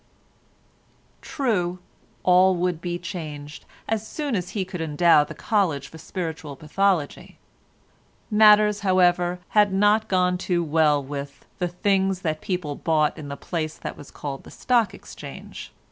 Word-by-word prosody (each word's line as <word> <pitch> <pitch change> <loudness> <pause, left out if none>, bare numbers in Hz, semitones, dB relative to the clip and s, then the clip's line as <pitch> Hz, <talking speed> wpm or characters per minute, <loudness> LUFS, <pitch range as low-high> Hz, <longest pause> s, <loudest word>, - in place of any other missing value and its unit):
True, 210 - -1 0.5
all 185 +1 +5
would 175 -2 -1
be 175 0 -3
changed 150 -5 -7 0.2
as 220 -1 -2
soon 290 -5 -3
as 180 -2 -2
he 190 - 0
could 180 -2 -6
endow 160 0 +4
the - - -9
College 170 -11 0
for 160 - -12
Spiritual 160 -6 -5
Pathology; 160 +1 -1 0.9
matters, 210 -1 +6
however, 180 -2 +2
had 210 -2 +4
not 210 +3 +3
gone 180 -2 +1
too 175 -2 0
well 150 -2 +2
with 140 0 -7
"the 180 - 0
things 190 +1 0
that 155 -3 -2
people 180 -6 -3
bought 155 0 +1
in 155 -3 -8
the 140 0 -6
place 155 -3 -4
that - - -6
was 145 - -12
called 140 -2 -6
the - - -13
Stock 230 -6 +1
Exchange." - - -10
180 Hz, 145 wpm, -24 LUFS, 155-195 Hz, 0.9 s, matters